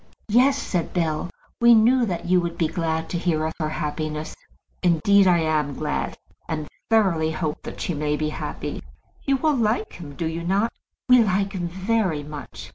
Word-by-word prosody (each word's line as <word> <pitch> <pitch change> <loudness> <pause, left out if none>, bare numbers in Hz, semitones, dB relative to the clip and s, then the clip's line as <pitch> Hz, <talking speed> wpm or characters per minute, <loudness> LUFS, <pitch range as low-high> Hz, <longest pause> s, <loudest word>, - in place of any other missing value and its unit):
"Yes," 260 +5 +4
said 180 - -2
Bell; 160 -1 0 0.3
"we 235 0 +7
knew 235 +2 +4
that 175 -3 -3
you 180 0 +3
would 170 -1 -4
be 165 - +2
glad 160 0 -2
to 175 - -1
hear 160 -3 0
of 160 - -2
her 155 -1 -1
happiness." 155 0 -3 0.5
"Indeed, 190 +3 +4
I 180 -1 +5
am 155 -3 0
glad; 150 +1 -2 0.3
and 155 -2 -3 0.2
thoroughly 190 -8 +3
hope 155 -1 -3
that - - -8
she 175 - -1
may 150 0 -1
be 155 0 -1
happy. - - -5 0.4
You 275 -1 +2
all 310 -1 +4
like 225 -3 0
him, 150 -5 -9
do 165 - -3
you 165 +1 -3
not?" 195 +6 +1 0.3
"We 250 -2 +7
like 195 0 0
him 175 -3 -2
very 190 -3 0
much." 150 0 -9
170 Hz, 185 wpm, -24 LUFS, 155-205 Hz, 0.5 s, we